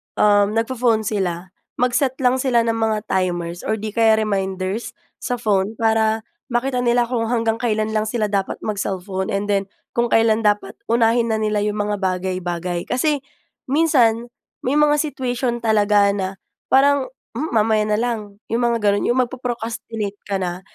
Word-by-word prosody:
um, 205 0 +3
na 225 - +3
pho-phone 230 -2 +1
sila, 185 -4 -2 0.2
mag-set 250 +2 +1
lang 250 +1 +3
sila 250 -3 +2
ng 230 0 0
mga 220 -2 0
timers, 175 -2 -1
or 220 - +1
'di 215 0 -5
kaya 225 0 +4
reminders, 195 0 -2 0.2
sa 245 - -2
phone, 210 -1 0
para 220 0 +1 0.3
makita 250 +2 0
nila 240 0 +3
kung 230 -2 -1
hanggang 225 -1 +1
kailan 220 -2 0
lang 215 -1 +1
sila 215 -1 0
dapat 195 -2 0
mag-cellphone, 190 -2 -3
and 200 +1 -2
then 195 -1 +1 0.2
kung 235 0 +1
kailan 225 -1 +3
dapat 205 0 +1
unahin 230 0 +3
na 220 - +1
nila 215 -1 0
yung 210 0 -1
mga 205 -1 -1
bagay-bagay. 180 -2 -2
Kasi 290 +3 +1 0.5
minsan, 250 -6 +2 0.3
may 260 +3 0
mga 295 0 +4
situation 250 -5 -2
talaga 210 -2 +4
na 190 -2 -1 0.4
parang, 275 0 +4 0.3
"Um, 310 +4 -3
mamaya 220 -1 +3
na 210 - +2
lang." 215 -4 -3
Yung 235 +2 +1
mga 235 -1 +2
ganun. 205 0 +2
Yung 240 - +2
magpo-procrastinate 230 -4 -4
ka 200 -1 0
na. 180 0 -3
220 Hz, 160 wpm, -21 LUFS, 200-240 Hz, 0.5 s, kaya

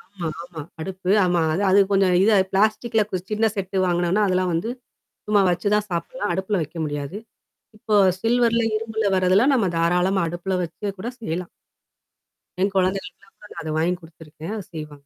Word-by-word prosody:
ஆமா, 175 -3 -3 0.2
ஆமா, 175 -3 -8 0.2
அடுப்பு. 185 +1 -3
ஆமா 175 -1 +2
அது 185 - -1
அது 195 +2 +5
கொஞ்சம் 195 -2 +3
இத 220 - +4 0.2
பிளாஸ்டிக்ல 215 +2 +2
கு 185 - 0
சின்ன 220 +1 +1
செட்டு 195 -1 -3
வாங்கனோனா, 175 +3 +1
அதெல்லாம் 185 -1 +1
வந்து 170 +8 -1 0.6
சும்மா 210 -1 +4
வச்சு 180 +4 0
தான் 210 0 0
சாப்பிடலாம். 175 +4 -3
அடுப்புல 190 +2 -1
வைக்க 155 +3 -10
முடியாது. 145 +5 -4 0.6
இப்போ 215 0 -1 0.3
சில்வர்ல, 235 0 +2 0.2
இரும்புல 220 0 -3
வரதெல்ல 185 +5 +4
நம்ம 230 -7 +2
தாராளமா 180 +3 +2
அடுப்புல 175 +3 -3
வச்சு 175 +4 -7
கூட 230 +6 -4
செய்யலாம். 175 -4 -4 1.1
என் 195 +1 +2
குழந்தைகளுக்குல 190 0 -1
நான் - - -50
கூட - - -12
அத 160 - -6
வாங்கி 170 +3 +1
குடுத்துருக்கேன். 160 +2 -10
அத 205 - -5
செய்வாங்க. 150 -3 -9
185 Hz, 165 wpm, -23 LUFS, 175-210 Hz, 1.1 s, அது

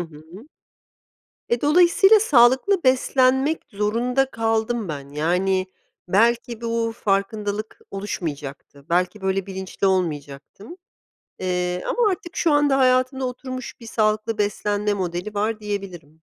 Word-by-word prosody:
hı. 165 - -10 1.0
E, 235 0 0
dolayısıyla 360 +7 +5
sağlıklı 285 - +4
beslenmek 265 +3 +2
zorunda 240 +6 0
kaldım 225 -1 -1
ben. 140 -3 -6
Yani 180 +6 0 0.4
belki 235 +4 +2
bu 230 -1 -1
farkındalık 205 +1 -2
oluşmayacaktı, 150 -8 -6
belki 180 +4 0
böyle 190 0 -1
bilinçli 190 0 -3
olmayacaktım. 175 - -3 0.6
Eee, 180 -1 -2
ama 475 -3 +2
artık 360 -2 -6
şu 330 - +2
anda 290 -2 +3
hayatımda 255 +1 +2
oturmuş 255 0 -7
bir 230 - -11
sağlıklı 215 0 0
beslenme 205 0 0
modeli 180 +2 -4
var, 215 +2 -1
diyebilirim. 195 -7 -6
215 Hz, 110 wpm, -22 LUFS, 185-255 Hz, 1.0 s, dolayısıyla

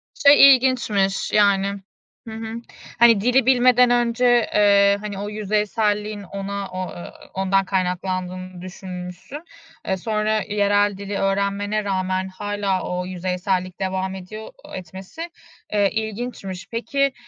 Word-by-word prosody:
Şey, 280 -2 +8
ilginçmiş 225 -7 0
yani. 200 -1 +2 0.5
Hı 220 - -7
hı. 225 0 -6 0.5
Hani, 230 -4 +6
dili 250 +2 +3
bilmeden 250 -1 +5
önce, 240 0 +3
ııı, 200 -1 +5
hani, 205 -2 -6
o 205 - -4
yüzeyselliğin 210 0 -1
ona, 200 +1 -5
o, 185 0 -4
ııı, 175 - -9 0.2
ondan 195 0 +1
kaynaklandığını 185 -1 -3
düşünmüşsün. 180 - -8 0.4
E, 190 - -1
sonra 215 +2 0
yerel 205 -1 +2
dili 200 0 -5
öğrenmene 200 +2 0
rağmen 185 -1 -1
hâlâ 200 0 -2
o 180 0 -2
yüzeysellik 185 0 -2
devam 190 0 -2
ediyor. 215 +4 -9 0.2
Etmesi, 190 - -8 0.4
e 205 -2 +2
ilginçmiş. 220 -3 -5
Peki, 275 +4 0
200 Hz, 120 wpm, -22 LUFS, 190-220 Hz, 0.5 s, Şey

